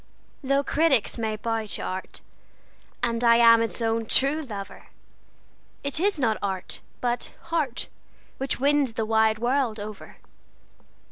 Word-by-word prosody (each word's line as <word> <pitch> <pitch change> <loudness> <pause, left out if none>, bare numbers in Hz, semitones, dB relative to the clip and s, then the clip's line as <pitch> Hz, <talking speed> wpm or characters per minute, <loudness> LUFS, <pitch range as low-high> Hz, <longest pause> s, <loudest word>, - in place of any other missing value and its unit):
Though 275 +1 +2
critics 280 -8 +2
may 220 -1 -1
bow 225 0 -2
to - - -4
art, 185 0 -5 0.8
and 235 0 0
I 235 -1 +6
am 230 -1 +7
its 230 +1 -2
own 225 0 0
true 280 +7 +2
lover, 205 -8 -8 1.0
It 280 +2 0
is 395 +1 +2
not 230 -6 +1
art, 190 -2 -3 0.2
but 240 -1 -2 0.2
heart, 335 - -1 0.5
which 270 -1 -2
wins 280 -2 +2
the 225 0 -1
wide 220 0 +3
world 240 -1 0
over. 210 0 -9
230 Hz, 135 wpm, -25 LUFS, 220-275 Hz, 1.0 s, am